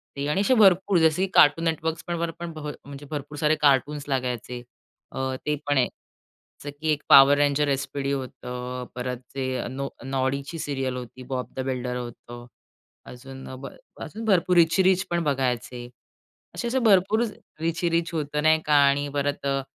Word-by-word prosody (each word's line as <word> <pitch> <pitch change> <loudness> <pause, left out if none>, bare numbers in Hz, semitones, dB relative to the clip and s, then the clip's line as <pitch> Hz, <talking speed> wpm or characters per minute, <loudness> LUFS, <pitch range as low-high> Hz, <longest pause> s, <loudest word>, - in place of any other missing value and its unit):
ते 140 0 -3
आणि 170 +6 +1
असे 230 +6 +3
भरपूर 190 -3 +5
जसे, 160 +2 +3
की - - -8
कार्टून 150 +3 +5
नेटवर्क्स 160 0 -2
पण 175 - -2
वर 170 0 -1
पण 170 -1 -5
भ 155 -1 -7 0.2
म्हणजे 140 +1 -10
भरपूर 145 0 -6
सारे 150 +1 +2
कार्टून्स 145 +1 +2
लागायचे. 125 -2 -3 0.5
अ, 130 0 -3
ते 150 - +1
पण 145 -1 +2
आहे. 125 - +3 0.8
च - - -9
की 160 - -1
एक 150 -1 0
पॉवर 140 +1 +8
रेंजर 145 0 +2
एसपीडी 140 0 -2
होतं. 125 -2 -5
परत 125 0 -3 0.2
ते 135 -1 -2 0.2
नॉ 135 +2 -4 0.2
नॉडीची 135 +4 -2
सीरियल 135 -3 -3
होती, 125 +1 -9
बॉब 130 -1 -3
द - - -6
बिल्डर 125 -1 -3
होतं. 120 0 -9 0.6
अजून 130 +2 -11
अ, 130 - -7
ब 135 - -7 0.4
अजून 225 +1 -7
भरपूर 185 -3 +3
रिची 170 +3 +4
रिच 185 0 +3
पण 170 -1 0
बघायचे. 125 -4 -2 0.7
असे-असे 240 +1 -1
भरपूर 215 -1 +3 0.4
रिची 165 +2 -1
रिच 170 +1 -1
होतं 150 -2 -2
नाही 160 0 +5
का 150 - +1 0.2
आणि 145 +1 0
परत 145 0 -2
अ, 135 0 0
145 Hz, 175 wpm, -25 LUFS, 130-165 Hz, 0.8 s, पॉवर